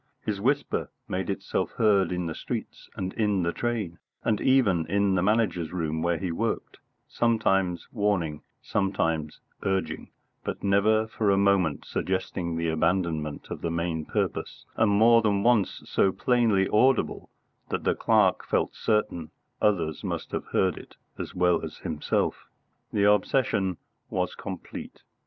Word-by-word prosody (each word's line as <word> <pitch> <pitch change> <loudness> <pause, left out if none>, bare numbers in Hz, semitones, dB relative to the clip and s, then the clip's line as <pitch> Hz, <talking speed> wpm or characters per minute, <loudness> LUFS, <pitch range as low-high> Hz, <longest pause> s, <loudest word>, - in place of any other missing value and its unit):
His 105 -2 -2
whisper 140 +5 0 0.2
made 95 +1 -2
itself 100 - -2
heard 100 -5 +3
in 90 -1 -2
the 80 - -3
streets - - -6
and 95 0 -3
in 105 -4 +1
the 85 0 0
train, 110 -8 -2 0.2
and 110 -2 +1
even 105 -12 +3
in 100 +2 +2
the 95 - +2
Manager's 95 -5 +1
room 80 -3 -2
where 85 0 +1
he 90 -1 -3
worked; 80 - -3 0.3
sometimes 95 -7 +1
warning, 100 -9 0 0.2
sometimes 80 -6 -1 0.2
urging, 95 -1 -2 0.3
but - - -5
never 105 +2 +3
for 110 -1 -1
a 100 - +4
moment 95 -7 +2
suggesting 90 -2 -2
the 85 0 -1
abandonment 80 -2 -1
of - - -5
the 85 - -1
main 85 -1 -1
purpose, - - -3
and 110 - +3
more 115 +3 +6
than 100 -3 +1
once 115 -5 +2
so 95 - +2
plainly 115 -5 +2
audible 125 +4 +2 0.4
that - - -2
the - - +2
clerk - - +3
felt - - 0
certain 105 -7 0 0.3
others 85 -7 +1
must - - -4
have - - -3
heard 95 -3 +1
it - - -14 0.2
as - - -6
well 90 -1 +2
as - - -6
himself. 75 -2 -2 0.4
The 100 - +1
obsession 105 -3 +2 0.3
was - - -1
complete. - - -8
95 Hz, 145 wpm, -27 LUFS, 85-105 Hz, 0.4 s, more